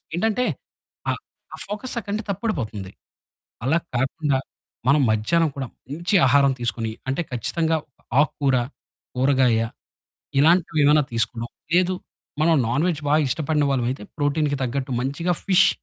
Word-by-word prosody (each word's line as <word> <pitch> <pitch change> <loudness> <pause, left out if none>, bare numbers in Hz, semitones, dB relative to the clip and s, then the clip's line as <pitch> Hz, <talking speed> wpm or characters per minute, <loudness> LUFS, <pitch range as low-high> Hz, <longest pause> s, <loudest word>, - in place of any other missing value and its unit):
ఏంటంటే 220 +6 +1 0.6
ఆ - - +4 0.4
ఆ - - -5
ఫోకస్ 210 +5 -4
అక్కడ్నుండి 210 0 -4
తప్పడిపోతుంది. 115 - -3 0.7
అలా 160 +6 +3 0.2
కాకుండా 135 +2 0 0.5
మనం 145 +2 +5
మధ్యాహ్నం 160 +10 +2
కూడా 135 -2 -3 0.2
మంచి 170 +8 -2
ఆహారం 140 +1 +5
తీసుకొని, 115 -1 -1 0.2
అంటే 135 +6 0
ఖచ్చితంగా 160 +7 +1 0.4
ఆకుకూర, 140 -3 +2 0.6
కూరగాయ 130 -3 +3 0.8
ఇలాంటివేవన్నా 155 -2 +4
తీసుకొడం. 115 0 -1 0.3
లేదు, 185 +1 +3 0.5
మనం 165 +1 +4
నాన్ 145 +7 +1
వేజ్ 170 -5 0
బాగా 150 +2 +4
ఇష్టపడిన 150 +1 +1
వాళ్ళమైతే, 125 -3 -1 0.2
ప్రోటీన్‌కి 145 0 +1
తగ్గట్టు 130 +1 -2
మంచిగా 145 +7 -1
ఫిష్ 185 -1 +5
145 Hz, 120 wpm, -23 LUFS, 130-170 Hz, 0.8 s, మనం